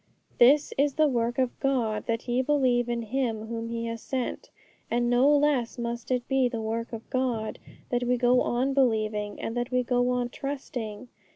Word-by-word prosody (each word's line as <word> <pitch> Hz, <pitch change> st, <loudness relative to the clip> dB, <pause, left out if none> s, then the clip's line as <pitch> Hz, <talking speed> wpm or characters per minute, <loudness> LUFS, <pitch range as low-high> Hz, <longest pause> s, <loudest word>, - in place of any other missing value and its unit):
This 280 Hz, +5 st, +5 dB
is 280 Hz, -1 st, +2 dB
the 310 Hz, -1 st, +4 dB
work 240 Hz, -3 st, 0 dB
of 255 Hz, -2 st, 0 dB
God, 235 Hz, -6 st, 0 dB
that 230 Hz, +1 st, -2 dB
ye 245 Hz, +1 st, +2 dB
believe 255 Hz, -4 st, +2 dB
in 235 Hz, -1 st, -1 dB
Him 225 Hz, -2 st, -2 dB
whom 230 Hz, 0 st, -4 dB
He 230 Hz, 0 st, -3 dB
has 230 Hz, -1 st, -4 dB
sent. 260 Hz, -2 st, -4 dB, 0.4 s
And 240 Hz, 0 st, +1 dB
no 250 Hz, +3 st, +5 dB
less 285 Hz, -5 st, +2 dB
must 235 Hz, 0 st, -4 dB
it 250 Hz, -2 st, -1 dB
be 265 Hz, -2 st, +2 dB
the 235 Hz, -2 st, -4 dB
work 225 Hz, +1 st, -3 dB
of 225 Hz, -1 st, -7 dB
God 250 Hz, -4 st, -1 dB, 0.3 s
that 245 Hz, 0 st, 0 dB
we 250 Hz, 0 st, +2 dB
go 245 Hz, +1 st, +4 dB
on 255 Hz, +3 st, 0 dB
believing, 215 Hz, -5 st, 0 dB
and 225 Hz, -, -4 dB
that 245 Hz, +1 st, -2 dB
we 250 Hz, -1 st, +1 dB
go 245 Hz, 0 st, +1 dB
on 245 Hz, -1 st, 0 dB
trusting. 250 Hz, -5 st, -5 dB
245 Hz, 190 wpm, -27 LUFS, 230-260 Hz, 0.4 s, This